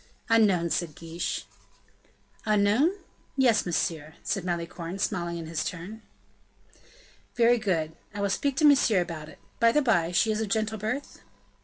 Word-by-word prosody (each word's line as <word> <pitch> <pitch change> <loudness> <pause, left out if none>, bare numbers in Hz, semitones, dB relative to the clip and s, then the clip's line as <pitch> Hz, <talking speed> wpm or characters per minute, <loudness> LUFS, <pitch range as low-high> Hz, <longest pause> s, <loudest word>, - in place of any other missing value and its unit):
"Unknown," 195 -7 +3
said 165 -4 -1
De - - -15
Guiche. 165 +1 -4 1.0
"Unknown? 215 +7 +3 0.5
yes, 240 -7 +3
monsieur," 160 -3 -2
said 195 - -2
Malicorne, 170 0 -4
smiling 175 -3 -2
in 165 - -6
his 160 0 -2
turn. 185 +6 -6 1.3
"Very 240 0 +4
good. 160 -6 -1 0.2
I 205 - -7
will 200 -1 +1
speak 280 +7 0
to 310 - +4
Monsieur 270 -8 +5
about 165 -3 -6
it. - - -14 0.2
By 230 0 +5
the 300 +4 +2
by, 175 -9 +2
she 220 +5 +3
is 215 0 -1
of 220 - -2
gentle 220 +1 -1
birth?" 250 +7 -4
195 Hz, 155 wpm, -27 LUFS, 170-225 Hz, 1.3 s, Monsieur